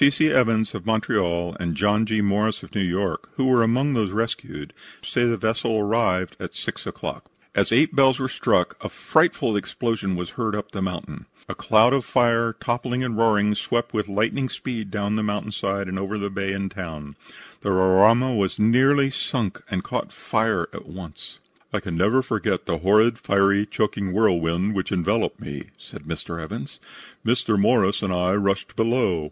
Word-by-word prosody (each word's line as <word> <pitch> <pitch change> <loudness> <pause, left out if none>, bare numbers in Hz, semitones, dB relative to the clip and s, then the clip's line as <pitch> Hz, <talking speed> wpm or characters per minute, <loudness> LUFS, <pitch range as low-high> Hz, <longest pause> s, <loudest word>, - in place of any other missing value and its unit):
C. 140 - +8
C. 155 +2 +2
Evans, 115 -5 +2
of - - -6
Montreal, 85 -6 0
and 85 -2 -2
John 105 +5 +2
G. 110 0 +1
Morris, 105 +1 0
of - - -13
New 105 - 0
York, 95 0 -2
who 130 - 0
were 130 -2 +4
among 130 +5 +2
those 110 -5 +1
rescued, 105 -8 -4 0.3
say 120 - 0
the 115 -1 +1
vessel 110 0 0
arrived 100 -4 0
at - - -7
6 - - -5
o'clock. - - -6 0.3
As - - +1
eight 135 +7 +3
bells 135 -2 +5
were 130 - -1
struck - - +1
a - - -4
frightful 110 - +1
explosion 100 -2 -2
was 90 -1 -5
heard 110 -4 -2
up 105 - -5
the 95 - -5
mountain. 90 -3 -5 0.2
A - - -4
cloud 110 +4 +4
of 135 -2 +1
fire, 115 -2 +2
toppling 120 +2 -2
and 120 -3 -2
roaring, 105 -2 +3
swept 120 +3 -2
with 105 -2 -1
lightning 110 +6 0
speed 115 -6 -5
down 100 +1 -1
the - - 0
mountain 105 0 -2
side 100 -1 -2
and 95 +1 -4
over 100 +2 -3
the 100 -1 -3
town 95 0 -2
and 95 0 -3 0.4
bay. - - -33 0.4
The - - -2
Roraima 100 +7 +4
was 100 -3 0
nearly 135 +5 +4
sunk, 120 -7 -2
and 95 -3 -2
caught - - -3
fire - - 0
at - - -9
once. 85 -1 -9 0.3
"I - - -1
can - - -5
never 105 +10 +3
forget 110 -6 -1
the 85 -4 -2
horrid, 110 +6 +4
fiery, 100 +1 +2
choking 100 -3 -1
whirlwind 90 -1 +1
which 95 -2 -3
enveloped 90 -4 0
me," 70 -1 -7
said 75 - -13
Mr. 85 +1 -5
Evans. 80 - -7 0.4
"Mr. 115 -2 +1
Morris 100 -1 +3
and 100 -3 -1
I 90 +1 +1
rushed 100 -1 -1
below. 115 -6 +1
105 Hz, 180 wpm, -23 LUFS, 95-115 Hz, 0.4 s, C